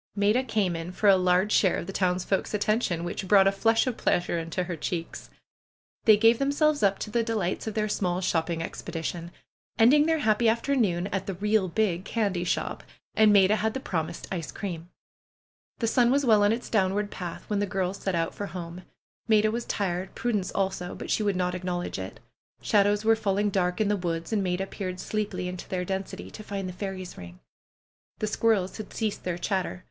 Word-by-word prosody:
Maida 210 +5 +3
came 200 -8 0
in 165 +2 -5
for 205 +3 0
a 195 - +8
large 185 +2 +2
share 190 -3 +3
of - - -4
the 195 - -7
townsfolks' 185 +2 0
attention, 205 -4 0
which 175 +2 -4
brought 195 0 +6
a 195 - +5
flush 225 +3 +2
of 255 -3 -2
pleasure 175 -1 +1
into 165 +2 -3
her 175 -1 -4
cheeks. 165 +1 -5 0.8
They 215 -2 +7
gave 225 +2 +5
themselves 290 +2 +2
up 200 -1 +3
to 210 - -6
the 235 - +2
delights 220 -4 -2
of 220 - -4
their 215 -1 +1
small 180 -3 -1
shopping 165 -2 -1
expedition, 170 +1 -5 0.5
ending 290 +7 +6
their 325 0 +2
happy 225 -4 +3
after 235 +5 +1
noon 185 -8 +1
at 195 -1 -2
the 195 - -3
'^real 205 -1 +1
big" 185 -3 0
candy 200 -5 -1
shop, 180 - -2 0.3
and 215 -1 +5
Maida 200 +1 +5
had 220 +2 -1
the - - -1
promised 170 -8 -4
ice 170 -5 -4
cream. 175 -4 -6 0.9
The 230 - -1
sun 235 +1 +3
was 275 +2 +2
well 215 -3 +5
on 205 - +4
its 235 +2 -2
downward 205 0 +1
path 175 -2 -7
when 205 -1 0
the 205 - 0
girls 190 0 -2
set 190 -2 -2
out 165 -1 -1
for 205 - -5
home. 175 -1 -7 0.5
Maida 215 -1 +4
was 235 +1 -3
tired; 185 -2 -2
Prudence 210 -6 -1
also, 190 -2 -2
but - - -6
she - - +2
would 205 -2 +1
not 180 0 0
acknowledge 180 - -3
it. 95 0 -7 0.4
Shadows 205 +1 +2
were 225 0 +5
fall 200 -3 -1
ing 205 0 +1
dark 180 -1 0
in 215 - +2
the 205 - +2
woods, 170 0 -3
and 210 - +2
Maida 185 +1 -1
peered 185 -2 -5
sleepily 210 -3 -3
into 180 0 -7
their 180 -1 -2
density, 190 +1 -5
to - - -9
find 200 -2 -4
the 180 - -6
fairies' 185 -1 -6
ring. 90 0 -11 0.8
The - - -2
squirrels 215 -3 +1
had 215 -2 -8
ceased 215 -3 -2
their 180 -2 -1
chatter. 185 0 -2
195 Hz, 205 wpm, -27 LUFS, 180-215 Hz, 0.9 s, a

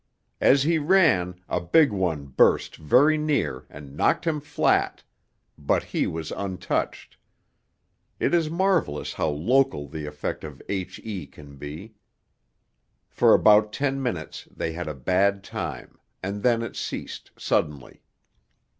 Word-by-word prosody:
As 135 0 +5
he 160 +2 +2
ran, 145 - +3
a - - -1
big 145 - +4
one 90 -7 -1
burst 65 - +2
very 140 - +4
near 140 - -1
and 70 -1 -11
knocked - - +1
him 160 -2 0
flat, 150 - 0 0.6
but 70 - +1
he - - -1
was 80 -1 -5
untouched; 95 -2 -3 1.0
it - - 0
is 165 -3 +2
marvellous 170 - 0
how - - -1
local 95 - +1
the 75 0 -6
effect 75 0 -5
of 75 -3 -9
H.E. 95 -2 -5
can 70 +1 -14
be. 80 - -8 1.2
For - - +5
about 105 0 +5
ten 135 -1 -1
minutes 90 -12 -4
they 80 - -4
had 90 0 -5
a 75 - -4
bad 95 +8 +1
time, - - -6 0.2
and 100 +2 -4
then 115 -1 +2
it 115 - -6
ceased, - - -6
suddenly. 75 -3 -2
95 Hz, 135 wpm, -25 LUFS, -, 1.2 s, As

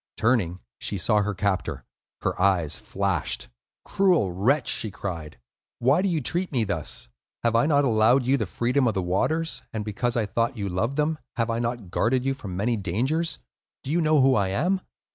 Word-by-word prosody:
Turning, 105 -7 +1 0.2
she 100 - -1
saw 105 +4 +2
her 105 0 -2
captor; 90 -10 -2 0.4
her - - -1
eyes 90 -6 +2
flashed. 95 -4 -2 0.4
"Cruel 180 - +2
wretch!" 115 +12 +1
she 110 - +1
cried. 85 -6 -6 0.4
"Why 135 +8 +3
do 195 - +1
you 165 -4 0
treat 175 +8 0
me 125 -5 +1
thus? 85 - -1 0.4
Have 115 -1 +2
I 115 +5 +4
not 145 -2 +3
allowed 120 +2 +4
you 130 +2 +3
the - - -1
freedom 125 +2 +1
of 110 - 0
the 95 - 0
waters, 155 - 0
and 110 -2 -4
because 120 +3 -1
I 115 - +1
thought 115 +3 0
that - - -15
you 100 -1 -2
loved 110 +9 -1
them, 155 +1 0 0.2
have 115 -1 0
I 115 - -1
not 120 -5 -3
guarded 125 +5 +1
you 135 - +1
from 100 -10 -7
many 115 +5 +1
dangers? 130 - 0 0.5
Do 140 - -4
you 170 +2 +2
know 155 -1 +3
who 135 0 +5
I 100 -5 +2
am?" 180 - 0
115 Hz, 200 wpm, -25 LUFS, 100-140 Hz, 0.5 s, who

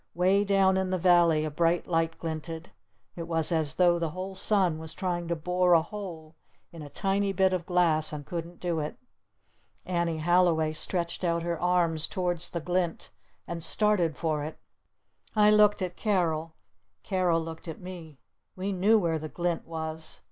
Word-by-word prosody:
Way 190 +3 +3
down 195 -1 +3
in 190 0 0
the 185 - 0
valley 170 -3 +4
a 155 - -3
bright 170 +3 +1
light 165 -1 0
glinted. 160 +1 -6 0.4
It 170 -1 -6
was 165 0 0
as 160 -2 0
though 175 -1 +4
the 165 -1 -1
whole 185 +4 -6
sun 190 -4 +1
was 160 0 -5
trying 175 -2 -2
to 170 - 0
bore 180 +2 +2
a 165 -1 +5
hole 170 -5 -8 0.4
in 165 - -10
a 145 - -8
tiny 195 +3 0
bit 190 0 +3
of 175 -2 -2
glass 165 -4 +2
and 150 -2 -6
couldn't 170 +1 -6
do 175 -3 -1
it. 150 0 -4 0.9
Annie 170 -2 -1
Halliway 165 -1 +2
stretched 170 +3 -2
out 170 -1 0
her 170 -1 -3
arms 175 -3 +1
towards 175 -2 -1
the 170 - -3
glint. 175 0 -2 0.3
And 170 -1 -5
started 180 -4 +1
for 155 -3 -1
it. 155 - -6 0.8
I 210 0 +6
looked 210 -2 +4
at 180 -1 -5
Carol. 165 -6 0 0.5
Carol 180 -3 +1
looked 165 +1 -7
at 160 - -6
me. 175 -5 -9 0.4
We 190 +2 -3
knew 200 +4 +4
where 165 -5 0
the 155 0 -6
glint 175 0 -2
was. 160 -1 -5
170 Hz, 175 wpm, -28 LUFS, 160-185 Hz, 0.9 s, I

